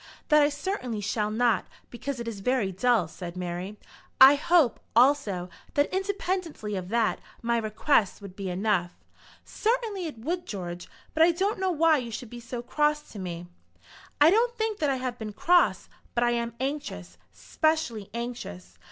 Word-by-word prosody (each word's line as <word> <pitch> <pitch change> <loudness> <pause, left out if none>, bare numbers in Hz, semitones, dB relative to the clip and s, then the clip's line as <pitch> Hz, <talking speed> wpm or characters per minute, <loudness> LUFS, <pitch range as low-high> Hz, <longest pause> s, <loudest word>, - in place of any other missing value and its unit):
"That 300 0 +6
I 290 - +4
certainly 290 - -3
shall 210 +1 -1
not, 225 -2 +1 0.2
because 255 +2 -5
it 235 - -5
is 220 -3 -5
very 225 -2 0
dull," 220 -1 +2
said 175 +1 -8
Mary. 180 +3 -4 0.4
"I 265 +2 +10
hope, 305 -3 +3 0.2
also, 235 -8 +3 0.3
that, 285 +4 +2
independently 370 - -2
of 185 -1 -5
that, 230 0 +1 0.2
my 235 0 +1
request 220 0 +1
would 200 -3 -10
be 195 -2 -4
enough." 180 -1 0 0.5
"Certainly 435 -5 -1
it 295 - -8
would, 340 +10 -3
George; 175 -3 -6 0.2
but 320 - 0
I 335 +2 +7
don't 390 +4 -1
know 380 0 +1
why 325 -2 +4
you 245 -3 -4
should 225 +1 -7
be 240 - -7
so 240 0 -6
cross 300 +3 0
to 210 - -8
me." 175 -2 -5 0.7
"I 300 +3 +7
don't 475 +3 +2
think 440 -1 -1
that 295 - +1
I 270 - +1
have 255 -1 -4
been 215 -2 -5
cross; 350 - +3 0.3
but 240 - +2
I 240 - +3
am 235 0 -2
anxious, 90 - -4
specially 235 - -1
anxious. 90 - -7
240 Hz, 170 wpm, -27 LUFS, 205-305 Hz, 0.7 s, I